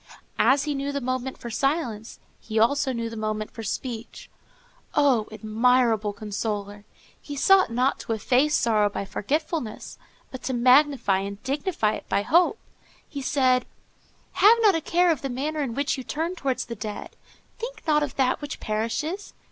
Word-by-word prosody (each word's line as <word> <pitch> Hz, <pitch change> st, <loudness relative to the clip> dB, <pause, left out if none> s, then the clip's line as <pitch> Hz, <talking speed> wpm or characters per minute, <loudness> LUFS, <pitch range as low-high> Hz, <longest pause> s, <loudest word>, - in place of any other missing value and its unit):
As 275 Hz, +1 st, +4 dB
he 300 Hz, -1 st, -1 dB
knew 280 Hz, 0 st, -2 dB
the 280 Hz, -, -2 dB
moment 255 Hz, 0 st, -3 dB
for 235 Hz, -, -7 dB
silence 240 Hz, -4 st, -2 dB, 0.2 s
he 220 Hz, -, -9 dB
knew 220 Hz, -, +6 dB
also 280 Hz, +3 st, +1 dB
the 230 Hz, -2 st, -4 dB
moment 215 Hz, -1 st, -3 dB
for 225 Hz, -, -8 dB
speech. 230 Hz, +1 st, -6 dB, 0.6 s
Oh, 265 Hz, -7 st, +3 dB
admirable 220 Hz, 0 st, +2 dB
consoler! 205 Hz, 0 st, -4 dB, 0.4 s
He 290 Hz, -, -7 dB
sought 380 Hz, +6 st, +5 dB
not 250 Hz, +3 st, +1 dB
to 225 Hz, -, -3 dB
efface 260 Hz, +7 st, +2 dB
sorrow 215 Hz, -3 st, +2 dB
by 200 Hz, -, -4 dB
forgetfulness, 285 Hz, -, -3 dB, 0.3 s
but 260 Hz, -, -7 dB
to 260 Hz, -, -3 dB
magnify 255 Hz, -4 st, +4 dB
and 200 Hz, +1 st, -6 dB
dignify 275 Hz, -, 0 dB
it -, -, -8 dB
by 200 Hz, -, +1 dB
hope. 350 Hz, -, +3 dB, 0.5 s
He 285 Hz, -4 st, -6 dB
said:— 255 Hz, -2 st, +2 dB, 0.6 s
"Have 440 Hz, +3 st, +6 dB, 0.2 s
a 325 Hz, -, 0 dB
care 350 Hz, +2 st, +3 dB
of 310 Hz, -, -1 dB
the 275 Hz, -, -3 dB
manner 295 Hz, +5 st, -2 dB
in 250 Hz, -5 st, -3 dB
which 280 Hz, 0 st, -1 dB
you -, -, -6 dB
turn 325 Hz, +7 st, -3 dB
towards 275 Hz, -7 st, -2 dB
the 235 Hz, -, -6 dB
dead. 210 Hz, -1 st, -7 dB, 0.4 s
Think 475 Hz, -1 st, -6 dB
not 300 Hz, -2 st, +3 dB
of 295 Hz, -3 st, -3 dB
that 260 Hz, +1 st, +1 dB
which 290 Hz, -, -6 dB
perishes. 230 Hz, -, -3 dB
255 Hz, 165 wpm, -25 LUFS, 220-290 Hz, 0.6 s, knew